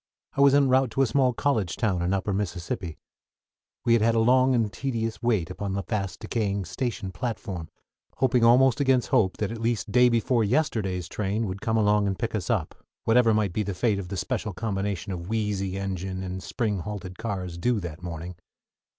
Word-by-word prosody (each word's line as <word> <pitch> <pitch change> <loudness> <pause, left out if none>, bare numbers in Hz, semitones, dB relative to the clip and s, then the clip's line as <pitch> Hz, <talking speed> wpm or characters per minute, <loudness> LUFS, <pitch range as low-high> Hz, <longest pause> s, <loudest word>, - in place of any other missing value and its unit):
I 140 - +1
was 140 0 +6
en 140 -1 +5
route 130 0 +3
to 135 - +3
a - - +4
small 130 +2 +2
college 115 -8 0
town 100 -6 0
in 90 +1 0
Upper 100 +1 0
Mississippi. 90 -3 -3 0.9
We 115 - +4
had 115 - +4
had 115 +1 +3
a - - +3
long 130 +3 +4
and 110 -3 0
tedious 115 -5 -3
wait 110 -9 +1
upon 95 +1 -4
the 100 0 -2
fast 95 -5 -3
decaying 100 -3 -1
station 100 +1 -3
platform, 95 -4 -4 0.5
hoping 125 -2 +2
almost 125 +2 +5
against 130 -3 +2
hope 95 -3 +2
that 105 0 -2
at 115 -1 -6
least 115 -2 -1
day 125 +1 +6
before 115 0 +2
yesterday's 105 - 0
train 105 +3 -2
would 95 0 -5
come 110 0 0
along 105 -1 +3
and 95 -1 -1
pick - - -3
us - - -3
up, - - 0 0.3
whatever 115 0 +4
might 105 -4 +1
be 110 - 0
the 100 -2 -3
fate 105 0 +1
of 95 - -6
the 95 +1 -5
special 100 +3 -2
combination 100 -1 -3
of 85 +1 -6
wheezy 105 -4 -1
engine 95 -1 -3
and 95 0 -5
spring 105 -4 -2
halted 90 0 -6
cars 95 -6 -4
due 120 +4 +1
that 85 -2 -7
morning. 85 0 -6
105 Hz, 200 wpm, -26 LUFS, 95-115 Hz, 0.9 s, was